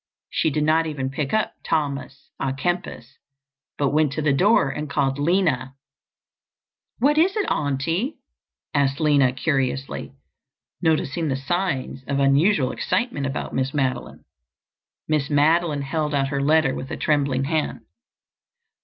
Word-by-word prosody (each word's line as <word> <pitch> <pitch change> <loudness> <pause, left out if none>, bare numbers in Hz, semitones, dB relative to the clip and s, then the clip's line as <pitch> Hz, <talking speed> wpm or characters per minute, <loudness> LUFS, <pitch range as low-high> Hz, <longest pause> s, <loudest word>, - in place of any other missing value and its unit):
She - - +1
did 150 +1 0
not 160 +1 +3
even 135 -4 -3
pick 140 0 -3
up 215 0 0
Thomas 140 -2 -3
à 135 0 -1
Kempis 160 -7 -3 0.6
but 140 -2 +1
went 150 -1 +2
to 155 - -2
the 145 -2 +3
door 185 +1 +4
and 150 +2 -5
called 140 -1 0
Lina. 150 -5 +1 1.2
"What 295 +5 +3
is 380 +6 +3
it, 415 - +1
Auntie?" 165 - -1 0.6
asked 140 0 +1
Lina 145 -5 +4
curiously, 135 -1 -2 0.7
noticing 160 -1 +1
the 135 - 0
signs 135 -2 -2
of 140 - -1
unusual 140 +2 +3
excitement 225 - -1
about 135 - -4
Miss 135 +3 -1
Madeline. 135 -3 -2 0.8
Miss 150 -2 0
Madeline 150 0 +2
held 150 +1 -1
out 135 -1 +1
her 140 -1 -1
letter 150 -1 +3
with 135 - -6
a - - -4
trembling 140 -3 +1
hand. 155 +2 -1
145 Hz, 135 wpm, -23 LUFS, 135-160 Hz, 1.2 s, door